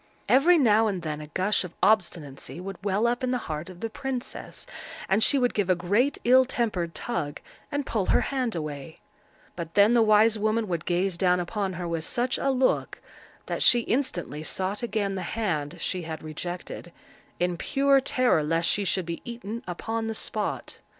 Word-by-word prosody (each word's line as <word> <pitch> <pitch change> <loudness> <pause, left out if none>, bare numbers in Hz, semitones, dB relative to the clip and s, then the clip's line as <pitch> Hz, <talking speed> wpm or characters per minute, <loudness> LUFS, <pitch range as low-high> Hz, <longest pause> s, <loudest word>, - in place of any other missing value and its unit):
Every 335 +7 +6
now 225 -5 +4
and 190 -4 -2
then 155 -1 -4
a 150 - -8
gush 185 +8 +1
of 180 -2 -9
obstinacy 165 -8 0
would 195 +1 -7
well 205 +2 +1
up 240 +1 0
in 255 - +1
the 250 - +1
heart 155 +2 -4
of 180 -1 -12
the 225 - -2
princess, 265 0 -5 0.4
and 195 +3 +2
she 280 - +5
would 245 -2 +2
give 205 -3 0
a 185 - +5
great 205 +11 +1
ill 255 +2 +6
tempered 215 -10 -2
tug, 155 -12 -3 0.3
and 285 -1 -1
pull 210 -7 -1
her - - +4
hand 255 -6 -1
away; 150 -1 -6 0.6
but 170 -2 -6
then 205 +3 +6
the 235 - +5
wise 215 0 +5
woman 215 +1 +1
would 170 -3 -3
gaze 180 0 0
down 180 -1 +3
upon 190 +2 -2
her 175 0 -4
with 165 -1 -2
such 250 +6 0
a 275 - +1
look, 260 -1 +1 0.5
that - - -3
she 240 - +6
instantly 225 - -2
sought 190 +5 -1
again 215 -4 -1
the 190 - -3
hand 175 -7 -2
she 185 - -2
had 160 -1 -6
rejected, 175 +2 -6 0.5
in 180 0 +1
pure 275 +8 +3
terror 255 - +2
lest 165 +2 +1
she 205 - +2
should 185 -2 0
be 170 0 -5
eaten 235 -1 -6
upon 225 +5 -3
the 225 - -3
spot. - - -3
200 Hz, 190 wpm, -26 LUFS, 175-235 Hz, 0.6 s, Every